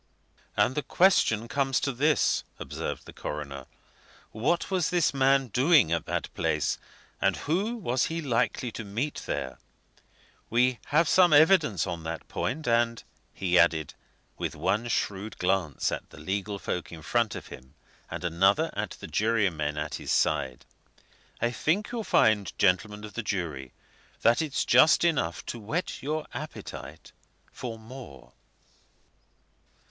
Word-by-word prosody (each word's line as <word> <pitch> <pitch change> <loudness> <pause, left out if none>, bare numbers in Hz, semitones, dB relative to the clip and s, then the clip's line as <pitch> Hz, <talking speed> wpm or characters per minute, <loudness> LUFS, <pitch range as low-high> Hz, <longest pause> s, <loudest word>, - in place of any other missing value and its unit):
"And 125 - +3
the 150 - -1
question 120 - +3
comes 135 0 +1
to 135 - 0
this," 145 +4 +2
observed - - -5
the - - -11
coroner, 70 -3 -6 0.6
"what 150 - 0
was 180 -4 +1
this 175 -5 +2
man 135 -1 +3
doing 130 - +4
at 85 -2 -1
that - - -3
place, - - 0 0.4
and - - +2
who 195 +10 -1
was 130 - 0
he 165 +1 -3
likely 125 -4 0
to 110 - -6
meet 115 +9 -3
there? 65 -1 -3 0.9
We 125 +1 +2
have 160 +2 +3
some 180 0 +5
evidence 155 - +5
on 85 -1 -4
that 80 0 -6
point, 150 +3 -3
and," 115 0 +2 0.3
he 90 -2 +2
added, 80 -3 +2 0.5
with - - -3
one 105 +6 0
shrewd 105 -2 -2
glance 90 -6 0
at - - -5
the - - -15
legal 100 +5 -3
folk 90 -2 -4
in 80 -2 -10
front 115 +4 +1
of - - -8
him 65 +3 -12 0.3
and - - -6
another 90 +4 +2
at - - -4
the - - -6
jurymen 95 -10 0
at 75 0 -3
his - - -3
side, 65 -2 0 0.7
"I 120 - +1
think 175 - 0
you'll 235 -2 -3
find, 105 - +3
gentlemen 105 +4 +1
of 105 - -8
the 120 - -3
jury, 80 - -3 0.5
that 120 +4 +4
it's 150 -4 -1
just 160 - +6
enough 130 - 0
to 120 - -5
whet 150 - -3
your 155 +3 -2
appetite - - -8 0.4
for 115 -3 -6
more." 110 - -12
115 Hz, 145 wpm, -28 LUFS, 90-145 Hz, 0.9 s, just